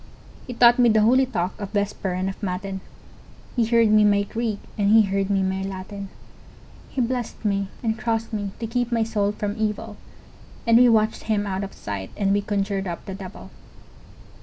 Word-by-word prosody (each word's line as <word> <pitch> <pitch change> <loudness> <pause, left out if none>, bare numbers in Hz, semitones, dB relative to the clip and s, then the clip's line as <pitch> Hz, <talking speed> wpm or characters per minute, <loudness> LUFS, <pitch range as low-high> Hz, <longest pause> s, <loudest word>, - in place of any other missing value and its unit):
He 250 - -6
taught 240 +1 +6
me 240 -1 +6
the 215 -1 +4
holy 255 +4 +4
talk 180 -5 -3
of 200 - -4
Vesper 200 -2 -2
and 185 +1 -1
of 195 - -6
Matin, 190 0 -3 0.7
He 235 -3 +2
heard 230 -1 +4
me 215 0 +6
my 205 -1 +4
Greek 220 +1 -2 0.2
and 200 -1 +1
he 220 0 +7
heard 195 0 -1
me 195 -1 +2
my 190 0 -1
Latin, 195 +1 -6 0.8
He - - -5
blessed 240 -2 -3
me 200 -1 +1 0.2
and 220 -1 -1
crossed 225 0 -2
me 205 -2 -2
to 230 - -4
keep 245 +1 -1
my 230 -1 +2
soul 210 -2 0
from 205 -1 -3
evil, 215 0 -2 0.7
And 230 0 +6
we 250 0 +7
watched 220 -1 +2
him 210 -2 0
out 195 0 -2
of 195 - -7
sight, 100 -2 -5
and 195 -1 +2
we 205 - +2
conjured 200 -1 -1
up 170 -1 -5
the 195 - -6
devil! 190 0 -9
205 Hz, 195 wpm, -24 LUFS, 195-225 Hz, 0.8 s, he